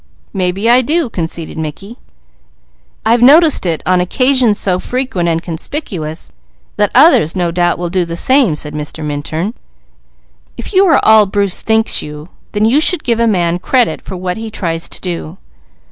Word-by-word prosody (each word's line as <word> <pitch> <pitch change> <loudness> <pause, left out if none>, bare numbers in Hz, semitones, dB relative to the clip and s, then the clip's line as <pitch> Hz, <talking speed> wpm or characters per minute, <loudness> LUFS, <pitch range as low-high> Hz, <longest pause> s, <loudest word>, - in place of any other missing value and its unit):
"Maybe 190 +2 -1
I 245 +2 +5
do," 295 0 -1
conceded 165 -2 -5
Mickey. 195 - -7 1.1
"I've 230 +1 +3
noticed 295 - +5
it 165 -2 -2
on 180 0 +2
occasions 255 +3 +2
so 180 -2 0
frequent 250 -8 -2
and 165 0 -1
conspicuous 165 - -6 0.5
that - - +2
others, 155 +4 +5
no 175 -2 -1
doubt, 175 0 0
will 175 -1 -4
do 185 -1 +1
the 170 0 -6
same," 255 - +2
said 150 0 -4
Mr. 150 +1 -6
Minturn. 155 +7 -4 1.0
"If - - -7
you 385 +1 +4
are 330 - +4
all 220 -2 +6
Bruce 200 -1 0
thinks 220 0 +1
you, 150 +2 -9 0.2
then 210 0 +1
you 260 +7 +3
should 360 +2 +2
give 235 -2 0
a 235 - +2
man 175 -4 0
credit 245 +5 0
for 190 - -8
what 180 +1 -4
he 225 0 -6
tries 165 -5 -4
to - - -6
do. 175 -1 -6
185 Hz, 170 wpm, -14 LUFS, 170-235 Hz, 1.1 s, all